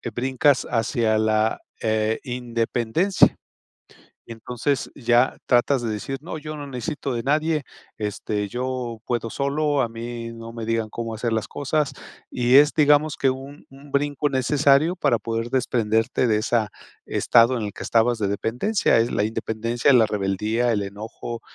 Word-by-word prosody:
brincas 130 +2 +2
hacia 115 -1 +1
la, 110 0 +1 0.2
eh, 110 0 0
independencia. 120 - +1 0.9
Entonces, 125 +4 -3
ya 120 -1 +2
tratas 125 +1 +3
de 115 - -2
decir: 120 +6 -4
"No, 160 0 -6
yo 155 0 -7
no 145 -1 -7
necesito 135 +1 -4
de 115 - -3
nadie. 155 +1 +1 0.3
Este, 105 0 -3
yo 125 0 -4
puedo 120 -2 -1
solo. 145 0 0
A 115 - 0
mí 115 0 -6
no 115 0 -9
me 115 -1 -6
digan, 115 -1 -1
cómo 115 0 -5
hacer 115 +1 -2
las 110 -1 -1
cosas". 145 +1 -1 0.4
Y 125 +1 +2
es, 150 +1 +6
digamos, 150 0 +3
que 135 -1 +2
un 135 +2 -9
un 140 +1 -15
brinco 145 +1 0
necesario, 140 +5 +3
para 120 -9 +2
poder 115 +1 -3
desprenderte 115 -1 +1
de 105 -1 +2
esa 110 -1 0 0.4
estado, 120 +1 +4
en 110 - -3
el 100 - -6
que - - -10
estabas 115 0 +2
de 100 - 0
dependencia. 120 - +1
Es 115 - +1
la 100 - +1
independencia, 115 +4 0
la 115 -3 +6
rebeldía, 105 +4 0
el 105 - 0
enojo, 110 +3 -7
120 Hz, 155 wpm, -23 LUFS, 115-140 Hz, 0.9 s, es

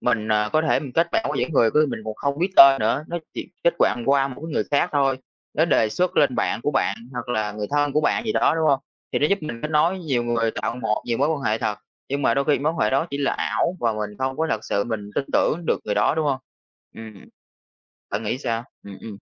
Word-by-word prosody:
Mình, 110 -3 0
à, 105 0 +2
có 155 - +3
thể 160 - +2
mình 135 -5 -8
kết 165 +1 +2
bạn - - +1
với - - -2
những 165 - -1
người 115 -6 +4
cứ 155 0 +3
mình - - -4
còn 110 -1 -4
không 140 +3 -2
biết 180 +4 0
tên 135 0 +9
nữa, 130 +7 0
nó 175 - -3 0.2
chỉ - - -6 0.2
kết 170 - +4
bạn 120 - +2
qua 140 0 +3
một 125 - -7
cái 160 0 -7
người - - 0
khác 140 - +2
thôi. 135 -2 +2 0.4
Nó 160 - +3
đề 125 -9 +2
xuất 180 +12 -1
lên 140 -4 +3
bạn - - -1
của 145 - 0
bạn 135 - 0 0.2
hoặc 125 0 -6
là 110 -3 -1
người 105 0 -4
thân 145 -1 +1
của 150 - +2
bạn 155 - 0
gì 220 - -1
đó, 160 - +3
đúng 160 -1 +1
hông? 135 -2 +3 0.3
Thì - - +1
nó 150 - +3
giúp 200 - +1
mình 120 -6 -6
kết 150 - -3
nối 165 +5 +2
nhiều 135 -8 -1
người, 115 -1 0
tạo 115 - -4
một 110 -3 -1
nhiều 115 -1 -1
mối 145 +3 +2
quan 155 -3 -1
hệ 110 +1 0
thật. 105 -2 -2 0.3
Nhưng 140 +1 -2
mà 115 - +3
đôi 140 - +1
khi 150 -1 +2
mối 150 +3 0
quan 165 - -8
hệ 105 -5 +2
đó 135 +6 +1
chỉ 140 - -4
là 140 - +1
ảo 175 +2 -1
và 115 -2 +1
mình 105 -1 -4
không 130 0 -2
có 160 - 0
thật 110 0 -2
sự 100 -1 0
mình 105 -3 -5
tin - - 0
tưởng 170 +2 +1
được - - +1
người 105 - -1
đó, 105 - +2
đúng 160 0 0
hông? 135 -2 0 0.6
Ưm, 110 -1 -10
ừm. 100 - -15 0.9
Bạn 100 +3 -2
nghĩ 115 +3 -2
sao? 115 -3 -2 0.2
Ừm, 100 -1 -10
ừm. 110 -3 -8
135 Hz, 285 wpm, -23 LUFS, 110-150 Hz, 0.9 s, tên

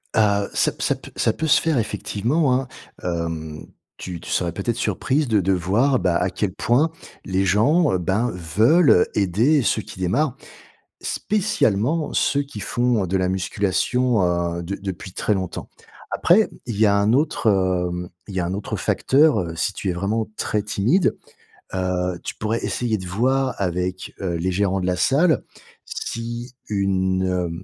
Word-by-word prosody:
Heu, 100 -2 +3
ça - - +2
p - - -20
ça - - +2
p - - -13
ça - - +1
peut 160 - -2
se - - +5
faire 160 -4 +1
effectivement, 125 +6 0
hein. 130 0 0 0.4
Hem, 80 -3 -4 0.3
tu 90 -2 -6
tu - - -10
serais 85 -2 0
peut-être 100 +7 -2
surprise 130 +7 0
de 110 -3 +3
de 95 +2 +2
voir, 105 +10 +2
bah, 90 -2 +2
à 90 - 0
quel 95 -2 -2
point 140 +10 +2 0.3
les 95 +1 0
gens, 130 - +3
heu, - - +2
ben, 95 +7 0
veulent 100 - +4
aider 110 - +3
ceux 110 - +1
qui 95 - -11
démarrent. 120 - 0 0.7
Spécialement 160 - 0
ceux 140 0 +2
qui 140 -6 -10
font 120 -1 0
de 95 +2 0
la 90 -1 +1
musculation, 100 +5 +1 0.4
heu, 85 - -4
de 100 +4 -3
depuis 95 -1 -6
très 105 - -1
longtemps. 95 -2 -4 0.4
Après, 210 +5 +4 0.2
il 115 - -4
y 110 - +5
a 100 - +4
un 100 +2 +3
autre, 140 -4 +1
hem, 90 -2 0 0.2
il 100 - -7
y 95 - 0
a 85 - -1
un 90 - -2
autre 100 - -4
facteur, 140 -4 +3
heu, 85 -2 -4
si 85 +4 0
tu 100 - -4
es - - 0
vraiment 105 +5 -1
très 105 -1 -1
timide, 115 - +1 0.6
heu, 90 -1 -1
tu - - -4
pourrais 110 +2 -2
essayer 120 -3 -1
de 95 - -8
voir 130 +7 +1
avec, 90 0 -2
heu, 90 -3 -2
les 90 +3 -1
gérants 95 0 +1
de 90 - -2
la 90 - +1
salle 155 - +3 0.4
si 120 +2 -5
une, 95 -2 0
heu, 90 -2 -1
100 Hz, 175 wpm, -22 LUFS, 90-125 Hz, 0.7 s, se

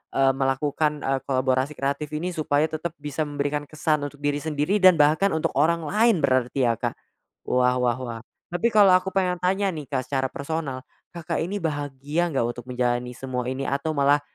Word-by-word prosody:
eee, 135 0 +4
melakukan, 145 +3 0
eee, 135 0 0
kolaborasi 130 +1 +1
kreatif 140 +2 -2
ini 170 +4 -2
supaya 150 -3 +1
tetap 160 +1 -4
bisa 150 +1 -2
memberikan 145 0 -2
kesan 155 0 0
untuk 145 0 -14
diri 145 0 0
sendiri 150 +5 0
dan 185 -2 +7
bahkan 155 +6 +3
untuk 160 - 0
orang 165 +2 +2
lain 210 +2 +2
berarti 130 0 +2
ya, 115 - -3
Kak? - - -2 0.5
Wah 125 0 +3
wah 120 -1 +1
wah, 120 -3 -5 0.3
tapi 225 +7 +2
kalau 205 -4 +6
aku 185 +1 +1
pengen 180 -2 +1
tanya 190 +2 +1
nih, 150 -4 -7
Kak, 130 -3 -2
secara 135 -1 0
personal. 140 -3 -4 0.3
Kakak 170 -2 -3
ini 190 +5 -3
bahagia 145 +1 -2
enggak 135 -6 0
untuk 120 0 -6
menjalani 125 0 -1
semua 130 -2 -3
ini 130 +1 -3
atau 140 +3 -1
malah 140 +1 +4
145 Hz, 185 wpm, -24 LUFS, 135-165 Hz, 0.5 s, dan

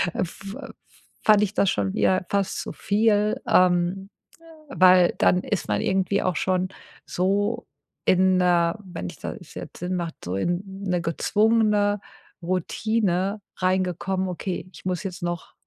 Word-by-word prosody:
f 195 +3 -4 0.7
fand 210 -1 +6
ich 210 0 -1
das 200 - +2
schon 100 - -1
wieder 185 -1 +2
fast 200 -1 0
zu - - -6
viel, 210 0 +1
ähm, 180 +2 +2 0.4
äh, - - -16 0.2
weil 185 -7 +5
dann 180 - +4
ist 210 - -2
man - - +1
irgendwie 190 +1 +1
auch 185 -2 0
schon 185 0 0 0.4
so 205 +6 0 0.4
in 185 0 +4
äh, 175 -1 +3
wenn 175 - -6
ich - - -11
das - - -8
jetzt - - -8
Sinn 180 +1 -2
macht, 170 -2 -3
so 90 +2 -3
in 175 - 0 0.2
'ne 180 -2 0
gezwungene 210 +3 +2 0.4
Routine 190 +2 -1 0.2
reingekommen: 185 0 0
„Okay, 185 +1 -4
ich - - -13
muss 180 0 -2
jetzt 180 -3 -6
noch, 175 -1 -4
185 Hz, 145 wpm, -24 LUFS, 175-200 Hz, 0.7 s, fand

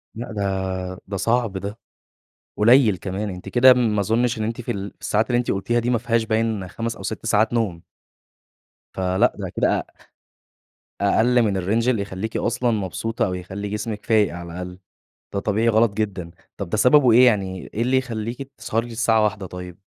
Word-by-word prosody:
لأ 115 +1 -6
ده، 100 -2 -1 0.4
ده 100 - -4
صعب 115 -1 0
ده، 100 +3 -6 0.8
قليِّل 115 -1 +5
كمان، 95 +3 -4
أنتِ 90 -1 -8
كده 130 +1 +7
ما 110 -4 +1
أظنش 115 +3 +1
إن 110 - -1
أنتِ 115 +2 -3
في 120 - -3
الساعات 100 +2 -2
اللي 120 - +3
أنتِ 120 - -1
قلتيها 120 +5 0
دي 120 +1 -1
ما 120 - +2
فيهاش 115 -1 0
باين 110 -4 -1
5 115 +4 -4
أو - - -10
6 110 0 -5
ساعات 110 +1 +2
نوم. 105 -8 -1 1.1
فلأ، 95 +5 +1
ده 95 -3 -4
كده - - +1
أ - - -5 1.2
أقل 120 +5 +3
من 100 -4 0
الrange 110 +6 0
اللي 115 -5 +2
يخلّيكِ 100 +3 -4
أصلًا 120 +1 0
مبسوطة، 115 +3 -2
أو 95 - -2
يخلّي 95 +3 -5
جسمِك 105 +1 -4
فايق 105 -5 +2
على 85 -1 -8
الأقل. 90 +1 -7 0.5
ده 100 - 0
طبيعي 110 +3 +1
غلط 110 -1 +3
جدًا. 95 -5 -3 0.3
طب 100 -4 -5
ده 110 - -1
سببه 125 +3 +5
إيه 125 +3 +7
يعني، 95 -6 0
إيه 110 - -2
اللي 130 +2 +2
يخلّيكِ 125 +2 -4
تسهري 115 +1 -2
للساعة 115 -1 +2
01:00 105 -2 -1
طيب؟ 90 -1 -9
110 Hz, 180 wpm, -22 LUFS, 100-115 Hz, 1.2 s, كده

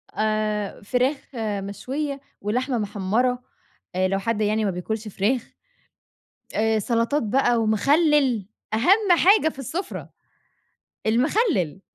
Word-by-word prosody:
آآ، 215 -1 -1
فراخ 255 +7 +1 0.2
مشوية 230 +8 -3 0.2
ولحمة 245 +5 -1
مِحمّرة، 220 +5 0 0.5
آآ، 185 0 +2
لو 195 +1 0
حد 220 +1 -1
يعني 215 +1 +1
ما 195 - +1
بياكُلش 215 +5 -4
فراخ، 220 +5 -1 1.0
آآ 220 0 +2
سَلَطات 230 +6 0
بقى 240 +2 +2
ومخلِّل، 270 - +3 0.3
أهَم 360 - +4
حاجة 385 -3 +5
في - - -19
السُفرة، 330 - -5 1.0
المخلِّل، 240 - +1
230 Hz, 105 wpm, -24 LUFS, 210-275 Hz, 1.0 s, حاجة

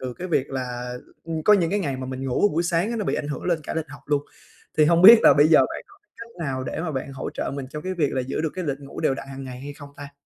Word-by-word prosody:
từ 125 -2 -5
cái 185 +1 -7
việc 140 -4 0
là, 125 -2 -4 0.3
ưm, 160 -1 -4
có 210 - +5
những 175 -4 +3
cái 205 - +1
ngày 140 -8 -2
mà 130 0 -6
mình 130 +1 -5
ngủ 130 +11 +2
buổi 165 +3 +1
sáng 170 +4 0
á 235 - -2
nó 210 - -2
bị - - 0
ảnh 145 - -3
hưởng 145 - -5
lên 175 -2 +1
cả - - -5
lịch 160 -2 -3
học 145 - -11
luôn. 145 -1 +1 0.6
Thì 155 - +7
hông 170 +2 +3
biết 225 +3 +10
là - - +8
bây 145 +2 +5
giờ 160 - +7
bạn - - -2
có 400 - -20 0.2
cách 230 0 -10 0.2
nào 130 -1 -3
để 130 - -4
mà 160 - -3
bạn 135 +1 -4
hỗ 135 - -5
trợ - - -4
mình 140 -2 -5
trong 150 +1 -6
cái 185 0 -3
việc 150 -5 0
là 130 - 0
giữ 130 +2 -3
được 160 -1 -1
cái 185 - -4
lịch 140 -3 -2
ngủ 140 - -9
đều 135 - +1
đặn 135 0 -8
hàng 135 0 -8
ngày 125 -1 -8
hay 145 +1 -7
không 145 0 -12
ta? 140 0 -10
145 Hz, 330 wpm, -24 LUFS, 135-170 Hz, 0.6 s, biết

